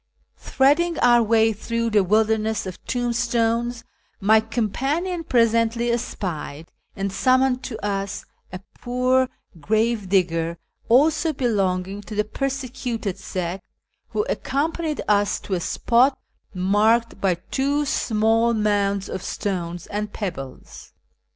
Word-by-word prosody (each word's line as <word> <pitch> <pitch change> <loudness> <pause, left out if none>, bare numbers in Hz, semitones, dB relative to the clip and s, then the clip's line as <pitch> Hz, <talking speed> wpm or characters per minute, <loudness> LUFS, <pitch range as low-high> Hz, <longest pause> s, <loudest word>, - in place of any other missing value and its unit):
Threading 310 +5 +2
our 240 -1 +5
way 225 0 +3
through 230 +2 -2
the 210 -2 +4
wilderness 220 +2 +1
of 185 -2 -8
tombstones, 235 -1 0 0.4
my 215 +2 +5
companion 270 - -2
presently 230 -2 +2
espied, 165 -9 -4 0.2
and 195 0 -3
summoned 255 +2 +2
to 230 - -5
us, 200 -1 -3 0.3
a 185 0 -7
poor 255 +1 +1 0.3
grave 220 +3 0
digger, 170 -3 +1 0.3
also 305 +6 +4
belonging 195 -6 -1
to 210 +1 -9
the 210 - +2
persecuted 250 -5 -3
sect, 180 0 -4 0.4
who 425 - -1
accompanied 310 +2 -2
us 205 -1 +2
to 195 - -5
a 180 - +1
spot 250 +9 +2 0.3
marked 210 +4 +2
by 190 -3 +2
two 280 +11 -1
small 225 -2 +2
mounds 200 -2 +1
of 190 - -5
stones 175 -4 -4
and 210 0 -4
pebbles. 165 -10 -7
220 Hz, 115 wpm, -23 LUFS, 195-245 Hz, 0.4 s, our